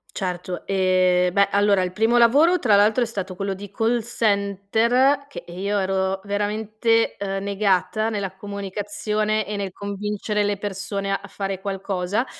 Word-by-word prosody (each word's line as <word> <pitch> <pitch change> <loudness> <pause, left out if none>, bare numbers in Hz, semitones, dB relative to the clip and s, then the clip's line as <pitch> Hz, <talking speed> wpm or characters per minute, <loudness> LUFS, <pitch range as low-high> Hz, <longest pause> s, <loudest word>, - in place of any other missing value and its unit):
Certo. 180 -1 -4
Ehm, 185 -2 +3
beh 200 +2 +3
allora 200 -1 +3
il 180 0 -3
primo 225 +4 +2
lavoro 290 +10 +5
tra 220 -9 +4
l'altro 210 +4 +4
è - - +3
stato 195 -5 -5
quello 195 0 -2
di 200 +1 -9
call 230 +3 +1
center, 225 +5 +1
che, - - -9
ehm, 175 0 -9
io 200 +2 -1
ero 190 0 0
veramente, 215 +2 0
ehm, 195 -1 -3
negata 200 +1 0
nella 200 -4 -3
comunicazione 205 +2 -2
e 210 - -3
nel 200 -2 -3
convincere 205 +2 -3
le 205 0 0
persone 200 0 -4
a 195 - -2
fare 195 -1 -4
qualcosa 195 +2 -2
200 Hz, 155 wpm, -23 LUFS, 195-215 Hz, -, lavoro